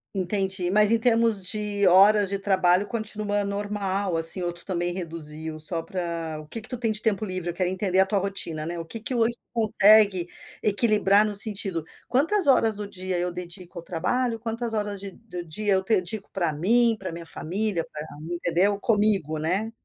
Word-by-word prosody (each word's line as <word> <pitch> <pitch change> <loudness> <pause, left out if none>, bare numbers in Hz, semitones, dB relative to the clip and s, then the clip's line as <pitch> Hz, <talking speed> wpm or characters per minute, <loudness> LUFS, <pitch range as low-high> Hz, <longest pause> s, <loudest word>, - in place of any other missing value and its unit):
Entendi, 190 -1 -1
mas 210 +1 +4
em 230 - +4
termos 230 -4 +2
de 205 0 0
horas 200 +2 +5
de 200 0 -2
trabalho 190 -1 +2
continua 210 -2 -2
normal, 200 -2 -2
assim, 165 +3 +6
ou 175 -1 -2
tu 175 0 -5
também 175 -2 -2
reduziu 160 -3 -5
só 165 +1 0
para 165 -3 -4
o 155 - -15
que 225 +8 -5
que - - -6
tu 250 - -4
tem 230 -2 0
de 210 - -1
tempo 215 -2 0
livre? 185 -3 -2
Eu - - -11
quero 180 +1 0
entender 185 0 0
a 190 - +4
tua 205 - 0
rotina, 180 -5 -3
né. 170 +1 -5
O 165 - -6
que 225 +8 -7
que 230 +4 -3
hoje 235 -1 +1
tu - - -61
consegue 210 -4 +4 0.4
equilibrar 210 -1 +3
no 210 -1 -2
sentido, 200 -5 +1 0.2
quantas 325 +8 +2
horas 225 -5 +4
do 205 0 -4
dia 185 -2 -3
eu 180 0 -1
dedico 180 +1 -9
ao 170 - -7
trabalho, 225 +8 -2
quantas 230 0 -4
horas 205 -2 -3
de 200 0 -7
do 180 -4 -9
dia 200 +6 -1
eu 190 0 +1
dedico 195 0 -1
para 175 -4 0
mim, 225 +10 +2
para 190 -4 -6
minha 170 0 -8
família, 190 +1 -2
para 150 - -6 0.3
entendeu 180 +4 0
Comigo, 205 - +1
né. 185 +8 -1
195 Hz, 195 wpm, -25 LUFS, 175-215 Hz, 0.4 s, assim